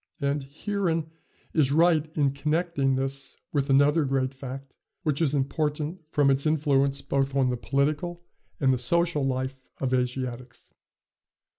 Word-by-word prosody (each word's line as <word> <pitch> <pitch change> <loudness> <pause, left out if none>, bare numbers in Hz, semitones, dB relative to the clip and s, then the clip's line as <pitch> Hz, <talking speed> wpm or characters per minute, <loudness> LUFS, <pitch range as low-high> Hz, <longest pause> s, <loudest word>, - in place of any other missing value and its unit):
And 140 0 0
Heeren 165 +2 -2 0.4
is 145 -4 +3
right 160 0 +3
in 140 -2 +3
connecting 150 -1 0
this 135 +1 -3 0.2
with 140 -1 0
another 145 +4 +4
great 135 -1 0
fact, 135 0 -8 0.3
which 150 -2 0
is 150 -3 +2
important 150 +4 -1
from 145 -2 +4
its 135 +3 +2
influence 140 -3 +2
both 135 0 0
on 130 -2 +3
the - - 0
political 150 +7 -1 0.4
and 135 -2 +3
the 125 - -1
social 170 +3 +2
life 130 0 -2 0.2
of 130 -1 -1
Asiatics. 125 -1 -3
140 Hz, 140 wpm, -26 LUFS, 135-155 Hz, 0.4 s, another